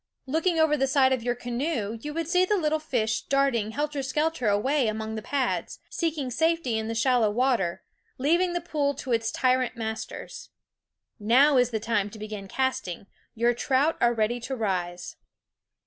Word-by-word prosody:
Looking 325 +5 0
over 315 -1 +4
the 270 -2 +1
side 265 -1 +4
of 255 - -1
your 245 +1 -1
canoe 240 -2 -3
you 295 - -5
would 330 +1 -3
see 360 +1 +3
the 410 +2 +2
little 315 -3 +1
fish 230 -7 -1
darting 275 -6 +1
helter 290 +4 -2
skelter 300 -1 -1
away 245 +6 +2
among 220 0 -3
the 220 - -4
pads, 260 +2 -2
seeking 310 -6 -2
safety 320 -5 +1
in 220 +1 -3
shallow 235 -1 +3
water, 225 -6 0 0.3
leaving 345 +7 +2
the 350 - -1
pool 290 -4 -1
to 260 -1 -6
its 225 0 0
tyrant 255 -1 +1
masters. 220 -1 -6 0.7
Now 260 +7 +5
is 245 -1 +4
the 225 -2 -2
time 215 -2 0
to 220 - -11
begin 210 -2 -7
casting; 215 -7 -2 0.3
your 235 +1 +2
trout 270 +6 +1
are 240 - +5
ready 225 +2 0
to 265 +3 -4
rise. 180 -6 -3
255 Hz, 170 wpm, -26 LUFS, 220-295 Hz, 0.7 s, Now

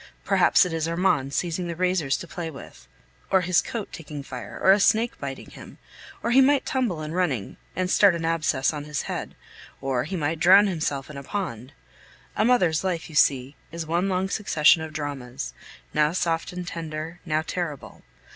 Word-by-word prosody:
Perhaps - - +4
it 180 - -4
is 160 -1 -1
Armand 165 -6 +1
seizing 175 +3 -2
the 170 - -4
razors 175 -6 +1
to 170 - -8
play 165 0 -5
with, 130 - -12 0.4
or 190 - +4
his 180 -1 +3
coat 225 -4 -6
taking 150 -3 -7
fire, 125 -6 -8
or 190 - +5
a 200 - +5
snake 225 +3 +3
biting 135 -1 -7
him, - - -12 0.5
or 235 - 0
he 265 +2 +7
might 275 +1 +3
tumble 225 -12 -1
in 155 - -5
running 155 - -1 0.2
and 185 0 0
start 190 0 +5
an 165 -1 -3
abscess 155 -4 +1
on 145 -1 -5
his 150 -1 -3
head, - - -5 0.4
or 135 -2 -1
he 185 - -4
might 160 -1 -1
drown 190 +5 +7
himself 155 -8 -2
in 145 - -9
a 140 - -7
pond. 130 - -5 0.6
A - - +2
mother's 185 -10 +3
life, 175 -4 -2
you - - -11
see, 135 -1 +3 0.2
is 165 0 -5
one 170 +4 0
long 185 0 0
succession 170 -6 +3
of 160 0 -6
dramas, 135 - -5 0.4
now 150 +1 +2
soft 165 -2 -1
and 180 -1 -6
tender, 160 0 -6
now 155 -1 0
terrible. 170 -7 -5
165 Hz, 190 wpm, -25 LUFS, 145-185 Hz, 0.6 s, he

